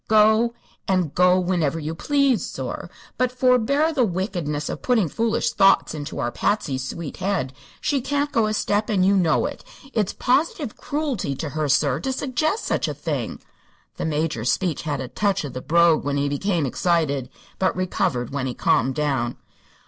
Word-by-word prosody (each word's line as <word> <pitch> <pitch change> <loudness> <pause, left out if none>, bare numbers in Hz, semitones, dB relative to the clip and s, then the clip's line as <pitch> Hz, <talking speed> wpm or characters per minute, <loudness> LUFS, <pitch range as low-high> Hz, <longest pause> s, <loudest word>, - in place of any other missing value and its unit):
Go; 220 +2 +4 0.3
and 185 -6 +1
go 180 +1 +4
whinever 175 -4 0
you 155 +1 -4
please, 275 - +2
sor; - - -5 0.3
but 255 -1 +2
forbear 255 +5 +2
the 270 -4 +2
wickedness 175 -7 -2
of - - -5
putting 230 -8 +2
foolish 230 +7 0
thoughts 195 -4 +4
into 150 0 -6
our 120 - -1
Patsy's 140 - -1
sweet 155 +3 -6
head. 180 -10 -1 0.3
She 280 -3 +1
can't 285 +3 -1
go 225 -2 +2
a 215 - -1
step, 210 +2 0
and 190 -4 +2
you 200 +1 +4
know 170 -5 +3
it. 285 - -5 0.3
It's 210 -4 0
positive 280 -1 0
cruelty 275 - -2
to 155 +2 -4
her, 150 +1 -2
sir, 140 0 +2
to 265 - -2
suggest 280 - -1
such - - 0
a - - -3
thing!" - - -4 0.5
The - - -3
Major's 150 -6 0
speech 175 -6 -1
had 145 -4 -3
a 130 - -4
touch 195 +6 0
of 140 - -7
the 130 - -5
brogue 170 +2 +4
when 140 0 -1
he 140 0 +1
became 160 +3 0
excited, 145 -2 0 0.3
but 185 - +1
recovered 140 -9 -1
when 135 -2 -2
he 125 - -4
calmed 130 0 +2
down. 135 -5 -1
180 Hz, 180 wpm, -23 LUFS, 145-230 Hz, 0.5 s, Go